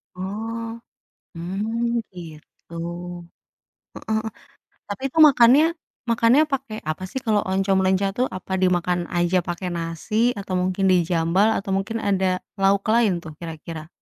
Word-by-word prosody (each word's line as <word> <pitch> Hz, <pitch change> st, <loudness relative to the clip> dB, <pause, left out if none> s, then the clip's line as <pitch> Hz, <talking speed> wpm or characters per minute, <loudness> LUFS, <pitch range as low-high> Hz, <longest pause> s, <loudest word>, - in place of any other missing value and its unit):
Oh, 225 Hz, +5 st, -5 dB, 0.6 s
mmm, 225 Hz, +7 st, -2 dB
gitu. 165 Hz, -2 st, -12 dB, 1.2 s
Heeh -, -, -12 dB
heeh, 220 Hz, 0 st, -1 dB, 0.6 s
tapi, 205 Hz, +5 st, -6 dB
tuh, 320 Hz, -, +1 dB
makannya 260 Hz, +3 st, +6 dB, 0.5 s
makannya 230 Hz, +5 st, +4 dB
pakai 265 Hz, -5 st, -3 dB
apa, 155 Hz, +4 st, -5 dB
sih, 265 Hz, -, -4 dB
kalau 210 Hz, -2 st, +2 dB
oncom 195 Hz, 0 st, +2 dB
leunca, 190 Hz, +1 st, +2 dB
tuh? 255 Hz, -, +2 dB
Apa 185 Hz, +1 st, -8 dB
dimakan 180 Hz, -1 st, +2 dB, 0.2 s
aja 175 Hz, +1 st, +2 dB
pakai 175 Hz, +1 st, -3 dB
nasi, 165 Hz, +4 st, -5 dB, 0.2 s
atau 195 Hz, -2 st, -4 dB
mungkin 185 Hz, +1 st, -1 dB
di-jambal, 175 Hz, +3 st, +2 dB
atau 195 Hz, -, -5 dB
mungkin 210 Hz, +4 st, -2 dB
ada 190 Hz, -1 st, +2 dB, 0.4 s
lauk 195 Hz, +1 st, +3 dB
lain, 230 Hz, -4 st, +4 dB
tuh, 160 Hz, -, -9 dB
kira-kira? 160 Hz, -1 st, -8 dB
195 Hz, 135 wpm, -23 LUFS, 175-225 Hz, 1.2 s, makannya